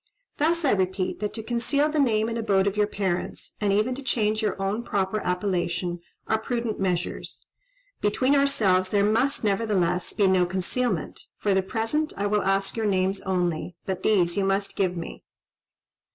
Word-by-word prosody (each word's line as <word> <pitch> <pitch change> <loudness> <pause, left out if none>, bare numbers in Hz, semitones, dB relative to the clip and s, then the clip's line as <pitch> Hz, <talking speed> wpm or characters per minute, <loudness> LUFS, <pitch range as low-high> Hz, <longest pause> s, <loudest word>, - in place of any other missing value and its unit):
Thus, 330 +2 +2
I 275 - +4
repeat, 190 -1 0
that 210 -1 -2
to 220 - -5
conceal 240 +6 +1
the 305 0 -1
name 220 -5 +2
and 230 - -3
abode 200 -4 +2
of 200 0 0
your 210 0 +2
parents, 190 -4 -3
and 205 -1 +2
even 215 +5 +2
to 270 - -6
change 220 -4 0
your 210 -3 -1
own 195 +4 -1
proper 200 -2 -1
appellation, 180 -2 -1 0.3
are 220 - +1
prudent 235 -1 -2
measures. 180 -3 -2 0.6
Between 255 +6 +2
ourselves 205 -10 +3
there 200 0 +3
must, 230 +7 +1
nevertheless, 195 -4 +1
be 205 - +2
no 185 -2 +4
concealment: 190 +7 -2 0.2
for 205 - +1
the 190 - +3
present 225 +10 -1
I 200 - -1
will 205 0 +2
ask 195 0 0
your 225 -2 0
names 190 0 +1
only, 175 -2 -1
but 190 -1 -3
these 180 -5 +2
you 200 - +2
must 195 +1 0
give 185 -2 0
me." 165 - -7
200 Hz, 175 wpm, -25 LUFS, 185-225 Hz, 0.6 s, I